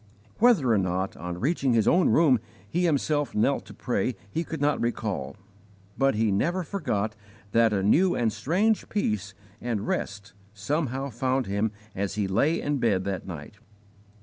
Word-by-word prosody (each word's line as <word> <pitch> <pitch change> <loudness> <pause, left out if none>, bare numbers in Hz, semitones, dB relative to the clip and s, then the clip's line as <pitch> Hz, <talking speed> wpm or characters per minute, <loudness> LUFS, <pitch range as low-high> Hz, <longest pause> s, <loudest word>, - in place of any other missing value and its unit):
Whether 210 - +5
or 105 - +3
not, 95 +1 -1
on 90 +1 -6
reaching 135 - +1
his 110 -3 +3
own 180 +1 +4
room, 145 -7 +5 0.3
he 175 - 0
himself 145 -2 0
knelt 135 +6 +1
to - - -10
pray 125 -1 -1 0.2
he 165 - -1
could 160 -1 -6
not 145 +1 +1
recall, 105 - -2 0.6
but 135 -3 +2
he 110 -1 +2
never 170 - 0
forgot 110 - -2 0.4
that 115 0 +4
a 100 -2 0
new 175 - +4
and 115 -3 +1
strange 185 - +1
peace 105 - -1 0.3
and 110 -3 -2
rest 100 0 -3 0.2
somehow 135 +4 -2
found 130 +2 0
him 100 +2 0 0.2
as 100 0 -3
he 105 -2 0
lay 145 - +2
in 145 -1 -1
bed 100 -6 +2
that 95 -1 -4
night. 85 +4 -8
115 Hz, 165 wpm, -26 LUFS, 100-145 Hz, 0.6 s, Whether